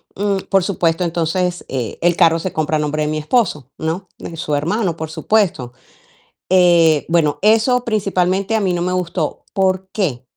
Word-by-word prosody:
mm, 200 0 0
por 195 -2 +3
supuesto, 175 -2 0
entonces 175 +1 -1
e 125 -4 -4
el 175 0 +3
carro 165 -1 +4
se 185 +2 -4
compra 155 0 0
a - - -2
nombre 150 0 -1
de 150 - -1
mi 155 - -2
esposo, 155 - 0
¿no?, 165 +4 -3
de 165 - -8
su 150 -2 -2
hermano, 170 +5 -1
por 160 -1 -6
supuesto, 170 - 0 0.8
eh, 170 -4 +4
bueno, 165 -3 +1
eso 225 +4 +3
principalmente 195 -2 0
a - - +2
mí 190 -3 0
no 175 - -2
me 180 +1 -1
gustó, 175 -3 -3
¿por 190 -1 0
qué? 145 - -2
175 Hz, 180 wpm, -18 LUFS, 160-195 Hz, 0.8 s, carro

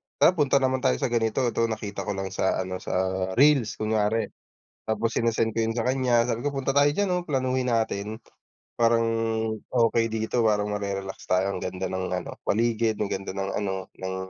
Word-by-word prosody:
tara - - +6
punta 145 -6 +1
naman 130 -1 +2
tayo 65 - +2
sa 120 - -2
ganito, 115 +2 +1
to 115 - +1
nakita 105 -2 -5
ko 100 - -1
lang 95 -1 -4
sa 95 - +1
ano, 95 0 -5
sa - - -4 0.4
reels 135 -5 +4
kunwari. 110 0 0 0.5
Tapos 110 +1 -1
sinesend 115 -1 +1
ko 115 - +1
yun 110 - 0
sa 115 +1 -2
kanya 125 -2 +2
sabi 115 -1 -2
ko 145 - 0
punta 135 -1 -2
tayo 145 +1 +5
diyan 190 +3 0
oh, 180 - 0
planuhin 130 -5 0
natin, 110 -2 -1 0.6
parang, 115 0 +3 0.6
okey 115 -2 +2
dito 110 +2 0
parang 105 -2 +2
mare-relax 100 -2 -4
tayo 95 +1 +3
ang - - -5
ganda 95 +1 -3
ng 95 0 -3
ano 90 -1 -3
paligid, 115 0 +1
ang 105 - 0
ganda 95 -1 -4
ng 95 0 -3
ano, 95 -2 -3
ng 95 0 -4
110 Hz, 190 wpm, -26 LUFS, 100-125 Hz, 0.6 s, tara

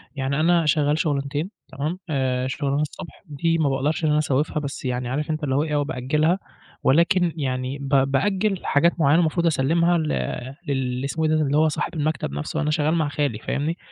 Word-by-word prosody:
يعني 135 +2 -1
أنا 170 0 +3
شغّال 150 0 +2
شُغلانتين 145 +3 -1 0.2
تمام، 155 +7 -3
آآ 130 -3 0
شُغلانة 140 +2 -1
الصبح 150 +2 -7
دي 165 +2 0
ما 155 -3 +2
باقدَرش 140 +4 -1
إن 155 - +3
أنا 150 - +3
أسوّفها، 150 0 0
بس 140 -2 -6
يعني 125 -1 -2
عارف 145 +4 -2
أنت 155 0 -3
اللي 135 -2 0
هو 145 - +2
إيه، 150 -2 -2
آه 145 - +2
بأجّلها 150 +7 0 0.4
ولكن 170 +3 +3
يعني 130 -2 -2
ب 140 -1 -6 0.2
بأجّل 195 +7 0
حاجات 170 +4 +2
معيّنة 150 +2 +4
المفروض 170 0 +1
أسلّمها 165 +3 +2
ل 160 -2 -1 0.6
لل 130 -2 -1
لإسمة 160 +3 -1
إيه، 155 - +2
اللي 150 -2 +2
هو 155 +1 +4
صاحب 150 - -3
المكتب 155 - -1
نَفسه، 75 - -3
أنا 150 0 0
شغال 155 +1 +1
مع 155 -3 +1
خالي 145 -7 -1
فاهمني، 155 +8 -2
150 Hz, 195 wpm, -23 LUFS, 140-160 Hz, 0.6 s, معيّنة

